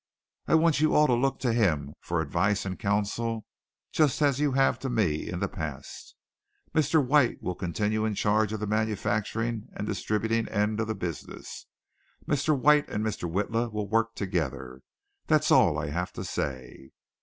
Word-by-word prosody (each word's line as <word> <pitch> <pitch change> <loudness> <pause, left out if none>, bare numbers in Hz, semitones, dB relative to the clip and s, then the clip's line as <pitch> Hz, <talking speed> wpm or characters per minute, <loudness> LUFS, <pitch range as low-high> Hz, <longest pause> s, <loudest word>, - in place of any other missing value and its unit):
I - - +4
want 160 -3 +3
you 155 - +3
all 150 - +6
to 125 - +3
look 135 +3 +1
to 120 -3 +1
him 75 -11 +1
for 85 -1 -1
advice 95 +5 0
and 95 -1 -4
counsel 105 +3 -1 0.5
just 150 -4 +2
as 140 -2 +2
you 145 -2 +1
have 135 0 +2
to 135 - -3
me 100 -11 0
in - - -4
the - - +1
past. - - -7 0.6
Mr. 155 -1 +3
White 140 -2 +2
will 90 - -1
continue 105 +5 -1
in 110 -2 -1
charge 105 +1 +2
of 110 - -3
the - - -1
manufacturing 110 +1 -1
and 105 - -4
distributing 110 +3 -1
end 105 +1 0
of 115 - -1
the 110 - -2
business. 90 -7 -7 0.6
Mr. 145 +1 +1
White 150 +2 +4
and 105 +1 -2
Mr. 90 -6 -3
Witla 115 +5 -1
will 105 -1 -3
work 115 +2 +1
together. 65 -10 -3 0.5
That's - - +3
all - - +5
I 75 - -3
have 90 +3 -2
to - - -6
say." 65 -1 -5
110 Hz, 175 wpm, -27 LUFS, 95-120 Hz, 0.6 s, all